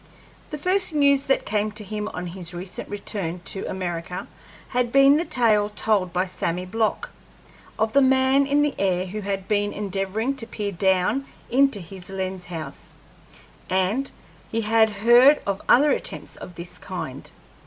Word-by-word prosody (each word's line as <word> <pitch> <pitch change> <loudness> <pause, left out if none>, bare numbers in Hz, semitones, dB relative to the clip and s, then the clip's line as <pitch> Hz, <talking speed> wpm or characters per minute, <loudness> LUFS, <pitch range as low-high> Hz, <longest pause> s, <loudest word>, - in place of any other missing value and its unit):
The 300 - -5
first 365 +1 +1
news 280 -1 +4
that 270 - +1
came 210 +1 0
to 215 0 -6
him 210 +1 -4
on 180 -3 -5
his 175 0 -7
recent 180 +1 -7
return 195 -4 -4
to 195 - -4
America 180 -1 -4 0.4
had 245 -1 0
been 275 +2 +6
the 335 - -1
tale 215 -7 +2
told 210 -3 0
by 180 +2 0
Sammy 180 -1 -3
Block, 220 +3 -1 0.7
of 220 0 0
the 280 - +5
man 265 +1 +4
in 290 +1 +3
the 295 -2 0
air 185 -2 +1
who 210 +3 -5
had 195 -1 -3
been 205 -1 +1
endeavoring 205 +5 -2
to 225 -4 -5
peer 205 -3 -4
down 190 +8 +1 0.2
into 270 -3 +3
his 180 +1 -9
lens 190 -1 -4
house, 160 -5 -8 0.7
and 190 +9 0 0.4
he 225 - -1
had 220 0 +4
heard 240 +7 +6
of 200 -1 -2
other 285 +4 +6
attempts - - -4
of 180 - -10
this 170 +1 -10
kind. - - -6
210 Hz, 165 wpm, -24 LUFS, 185-260 Hz, 0.7 s, been